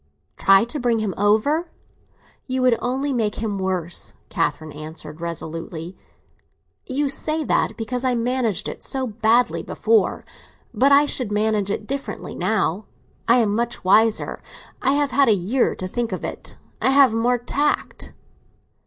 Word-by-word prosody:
"Try 195 +1 +5
to 240 +6 -4
bring 240 -2 +1
him 215 -4 -2
over? 220 - +2 0.8
You 260 0 -1
would 250 -2 +5
only 270 +3 -1
make 220 -4 0
him 210 -3 -3
worse," 185 -3 -3 0.2
Catherine 155 -1 -2
answered 155 +1 -9
resolutely. 165 +1 -6 0.9
"You 280 +2 0
say 310 +3 +1
that - - 0
because 245 +2 -3
I 255 -1 +2
managed 235 -4 -1
it - - -7
so 265 -1 -2
badly 230 +2 +2
before. 455 -1 +1 0.5
But 275 +2 +3
I 285 +1 +6
should 250 -6 -1
manage 210 -1 +1
it 210 +1 -3
differently 275 +3 -5
now. 210 -2 0 0.4
I 235 - +6
am 210 -3 +1
much 235 +1 -2
wiser; 215 +4 +3 0.4
I 270 - +2
have 285 -1 +1
had 280 0 +4
a - - +6
year 210 +8 0
to 185 - -5
think 235 +4 -3
of - - -4
it. - - -6 0.2
I - - +3
have 270 -3 +5
more 240 +2 +2
tact." 280 +5 -2
230 Hz, 155 wpm, -22 LUFS, 195-260 Hz, 0.9 s, I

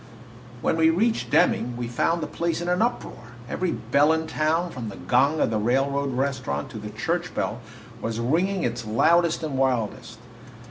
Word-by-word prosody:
When - - +1
we 160 0 +5
reached 220 +8 +1
Deming 120 0 +2
we 120 -1 -3
found 165 +8 0
the - - -1
place 170 +1 -2
in 175 - -4
an 180 +2 +1
uproar. 125 - -3
Every 185 +6 -1
bell 145 +2 +2
in 160 0 -1
town, 160 +2 0
from 120 -4 -6
the 100 - -8
gong 140 +9 +2
of - - +2
the 110 - 0
railroad 135 +4 0
restaurant 130 - -2
to 110 - -7
the 105 0 -7
church 175 +9 -3
bell, 115 - -2 0.4
was 115 0 -3
ringing 175 +10 +1
its 120 0 -2
loudest 165 +10 +2
and 140 -4 -2
wildest. 125 -5 -1
140 Hz, 180 wpm, -25 LUFS, 120-170 Hz, 0.4 s, we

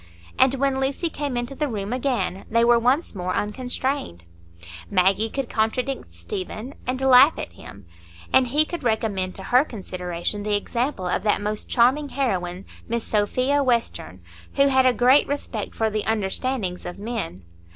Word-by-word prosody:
And 260 0 +5
when 270 0 0
Lucy 275 +5 -1
came 280 -4 -3
into 240 +2 -3
the 300 +2 -1
room 210 -3 -3
again, 250 -7 -1
they 230 +1 +3
were 240 0 +5
once 255 +8 +1
more 185 -2 -3
unconstrained; 245 - -3 0.7
Maggie 195 +3 +2
could 270 +1 -3
contradict 240 - -1
Stephen, 185 - -6
and 255 +1 -1
laugh 265 +3 +7
at - - -6
him, 100 -2 -12 0.5
and 260 -1 +5
he 295 +5 +3
could 345 +2 -6
recommend 215 -5 -1
to 190 - -8
her 250 +7 +4
consideration 185 - -4
the 210 0 0
example 235 0 -2
of 180 - 0
that 210 0 +2
most 210 +1 -3
charming 265 +5 +3
heroine, 185 -9 -2 0.2
Miss 235 0 -2
Sophia 255 +7 +1
Western, 230 - -1 0.3
who 275 0 +4
had 260 -1 +4
a 255 - +4
great 255 +4 +5
"respect 275 -6 -4
for 220 -1 0
the 215 0 -1
understandings 215 -1 -1
of 175 +1 -7
men." 205 - -5
235 Hz, 160 wpm, -23 LUFS, 200-265 Hz, 0.7 s, laugh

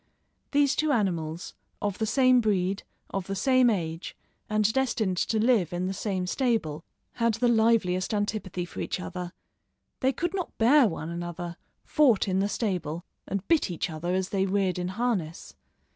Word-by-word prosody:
These 285 -1 +3
two 310 -1 +1
animals, 170 - -1 0.3
of 205 -2 -2
the 220 - 0
same 255 +1 +4
breed, 195 -3 0 0.3
of 195 -2 -3
the 195 - -2
same 255 +2 +4
age, 165 -5 -3 0.3
and 215 0 +2
destined 235 -8 0
to 220 - 0
live 220 -7 +3
in 175 +1 -2
the 190 - -2
same 190 -2 -2
stable, 180 - 0 0.4
had 230 -2 +3
the 245 +2 +1
liveliest 220 -6 +2
antipathy 205 -4 -2
for - - -9
each - - -2
other. 180 -1 -5 0.7
They 260 - +2
could 345 +6 -2
not 370 -3 -4
bear 250 +3 +6
one 160 -3 -4
another, 175 0 -5 0.3
fought 250 -10 +3
in 190 0 +1
the 200 +1 +1
stable, 175 -7 -2 0.2
and 195 0 -3
bit 325 -10 +3
each 175 +1 -3
other 175 +3 -2
as 190 0 -1
they 195 -1 0
reared 190 -2 0
in 180 - -2
harness. 190 - -2
195 Hz, 170 wpm, -27 LUFS, 180-230 Hz, 0.7 s, bear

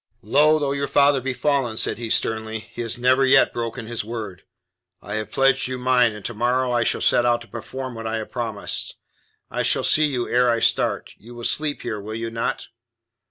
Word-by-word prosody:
"Low 150 +8 +4
though 145 -2 -1
your 140 0 -1
father 140 -1 +3
be 130 0 -3
fallen," 135 -6 0
said - - -1
he 115 -2 -4
sternly, 110 0 0
"he 110 +2 -9
has 115 0 -3
never 130 +2 +3
yet 135 0 +5
broken 115 0 -4
his 115 -1 -3
word. 105 -5 -6 0.6
I 105 - -8
have 110 0 -3
pledged 135 -1 +3
you 130 0 -4
mine, 125 -2 +3
and 105 -1 -10
to 120 - -3
morrow 125 +3 0
I 120 -1 +2
shall - - -1
set - - +4
out 120 -1 +2
to 115 - -12
perform 130 +3 -6
what 115 -1 -6
I 110 - -2
have 110 - -6
promised. 115 -5 -3 0.6
I - - -1
shall - - +1
see 155 - +3
you 125 -4 -2
ere 125 0 +3
I 115 -1 +2
start. - - 0
You 120 +3 -13
will 120 - -9
sleep 150 +3 -1
here, 110 -3 -3
will 110 +2 -6
you 115 0 -4
not?" 115 0 -3
120 Hz, 215 wpm, -22 LUFS, 115-130 Hz, 0.6 s, yet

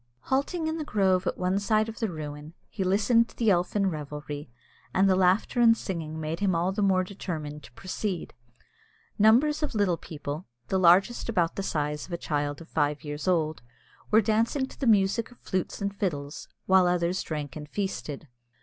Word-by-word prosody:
Halting 285 - -1
in 315 +1 -2
the - - -2
grove 190 -8 +1
at - - -1
one 185 +2 +1
side 215 +1 +2
of 225 - -7
the 225 - 0
ruin, 150 -1 -7 0.2
he 195 - -2
listened 220 +5 +3
to - - -17
the 225 -3 +3
elfin 190 +3 +1
revelry, 150 -2 -6 0.5
and 190 +1 +5
the 190 - +4
laughter 190 +6 +2
and 230 -1 +6
singing 160 -6 -4
made 160 +2 -3
him 195 -3 +1
all 175 +3 +1
the 205 +2 -2
more 190 -2 +3
determined 155 -6 -6
to 135 - -14
proceed. 185 - -4 0.9
Numbers 255 +9 +5
of 300 -6 -2
little 195 -5 +2
people, 150 +1 -6 0.2
the 190 - +1
largest 185 +8 +4
about 175 -7 +1
the - - -2
size 150 -5 -2
of - - -14
a - - -1
child 145 -2 -2
of 165 - -11
five 145 -2 0
years 145 +3 -5
old, 160 -4 +1 0.5
were 220 +1 +6
dancing 225 +6 +1
to - - -14
the 270 - -1
music 210 +1 +3
of 245 - -18
flutes 190 +2 -3
and 200 0 -2
fiddles, 150 -7 -3 0.2
while 190 -1 +5
others 175 +1 +1
drank 150 -4 -5
and 150 -1 -8
feasted. 160 -7 -4
185 Hz, 190 wpm, -27 LUFS, 155-215 Hz, 0.9 s, and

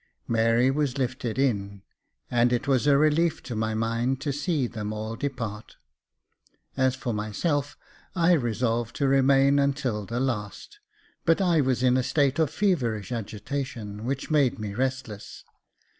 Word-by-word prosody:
Mary 115 +3 +3
was 140 -2 -1
lifted 130 -3 -2
in, 100 -7 -1 0.5
and 120 0 +3
it 120 +2 0
was 135 0 +2
a 140 -1 +6
relief 155 +3 +2
to 120 - -6
my 110 0 -1
mind 115 +4 0
to 145 0 -2
see 150 -1 0
them 110 -3 -5
all 110 +1 -4
depart. 115 -6 -5 1.0
As 130 -1 +2
for 125 -2 -3
myself, 140 - -2 0.4
I 170 -1 +3
resolved 120 -4 0
to 140 - +1
remain 135 +1 +4
until 135 -7 -1
the 120 +1 -2
last; 105 -7 -4 0.4
but 165 +2 +3
I 175 -5 +3
was 130 -2 0
in 125 0 +4
a 130 - +1
state 140 +1 +1
of 160 -3 +3
feverish 125 - 0
agitation, 110 -1 -5
which 135 +5 -3
made 140 -4 +3
me 105 -2 -5
restless. 130 -3 -4
130 Hz, 150 wpm, -26 LUFS, 115-140 Hz, 1.0 s, a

